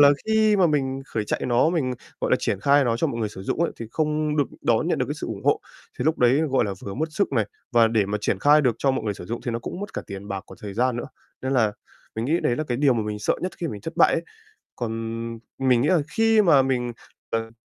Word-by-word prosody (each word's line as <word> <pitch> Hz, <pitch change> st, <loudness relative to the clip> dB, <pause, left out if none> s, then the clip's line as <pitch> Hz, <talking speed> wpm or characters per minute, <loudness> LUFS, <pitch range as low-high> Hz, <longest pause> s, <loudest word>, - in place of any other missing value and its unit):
là 145 Hz, -, +9 dB, 0.2 s
khi 220 Hz, -1 st, +4 dB
mà 185 Hz, -, +5 dB
mình 135 Hz, -3 st, 0 dB
khởi 110 Hz, -, -2 dB
chạy -, -, -2 dB
nó, 125 Hz, +6 st, +3 dB
mình, 135 Hz, -8 st, 0 dB, 0.3 s
gọi -, -, -1 dB
là, -, -, +5 dB
triển 95 Hz, -, -1 dB
khai 140 Hz, +5 st, +4 dB
nó 115 Hz, -2 st, +1 dB
cho -, -, +1 dB
mọi 115 Hz, -, -3 dB
người 110 Hz, -, 0 dB
sử 95 Hz, -2 st, -9 dB
dụng 150 Hz, -, -2 dB
ấy, 170 Hz, -, +1 dB
thì 115 Hz, -, -6 dB
không 150 Hz, +1 st, 0 dB
được 145 Hz, -, +3 dB, 0.2 s
đón -, -, +2 dB
nhận -, -, +1 dB
được -, -, 0 dB
cái -, -, -3 dB
sự -, -, -6 dB
ủng -, -, -6 dB
hộ. -, -, +3 dB, 0.4 s
Thì 125 Hz, -, -1 dB
lúc 160 Hz, +2 st, +1 dB
đấy, 125 Hz, +4 st, +4 dB
gọi 130 Hz, -2 st, +3 dB
là, 100 Hz, -2 st, -3 dB
vừa 100 Hz, -, -6 dB
mất 155 Hz, +4 st, -1 dB
sức 200 Hz, -2 st, 0 dB
này, 115 Hz, -6 st, +2 dB, 0.3 s
và 115 Hz, -1 st, +5 dB
để 110 Hz, -3 st, +2 dB
mà 105 Hz, +1 st, -2 dB
triển 95 Hz, -, 0 dB
khai 145 Hz, +7 st, +5 dB
được 125 Hz, -5 st, +2 dB
cho 135 Hz, -, +2 dB
mọi 130 Hz, -, -2 dB
người 105 Hz, -2 st, -1 dB
sử -, -, -9 dB
dụng 115 Hz, +3 st, -4 dB
thì 120 Hz, -, -1 dB
nó 115 Hz, -, -2 dB
cũng 145 Hz, +10 st, -6 dB
mất 205 Hz, -, -6 dB
cả -, -, -3 dB
tiền 100 Hz, +1 st, -8 dB
bạc, 100 Hz, -1 st, -3 dB
còn -, -, -13 dB
thời 100 Hz, -2 st, -7 dB
gian 125 Hz, +2 st, +1 dB
nữa. 120 Hz, -, -4 dB, 0.4 s
Nên 130 Hz, -, -1 dB
là 115 Hz, -5 st, +3 dB, 0.4 s
mình 110 Hz, -, -2 dB
nghĩ 160 Hz, +7 st, +1 dB
đấy 120 Hz, -, +1 dB
là 155 Hz, -, -2 dB
cái 125 Hz, -5 st, -2 dB
điều 135 Hz, -1 st, +3 dB
mà 115 Hz, -, 0 dB
mình 105 Hz, 0 st, -4 dB
sợ 105 Hz, -, +1 dB
nhất 185 Hz, -, -2 dB
khi 170 Hz, -, -2 dB
mình 105 Hz, -7 st, -6 dB
thất -, -, -7 dB
bại -, -, +5 dB
ấy. -, -, 0 dB, 0.5 s
Còn 120 Hz, -2 st, -3 dB, 0.7 s
mình 130 Hz, -3 st, +3 dB
nghĩ 140 Hz, -, +2 dB
là 180 Hz, -3 st, +4 dB
khi 225 Hz, +2 st, +4 dB
mà 150 Hz, -8 st, +6 dB
mình, 125 Hz, -2 st, -1 dB, 0.4 s
ờ, 115 Hz, 0 st, -2 dB
125 Hz, 290 wpm, -24 LUFS, 115-150 Hz, 0.7 s, là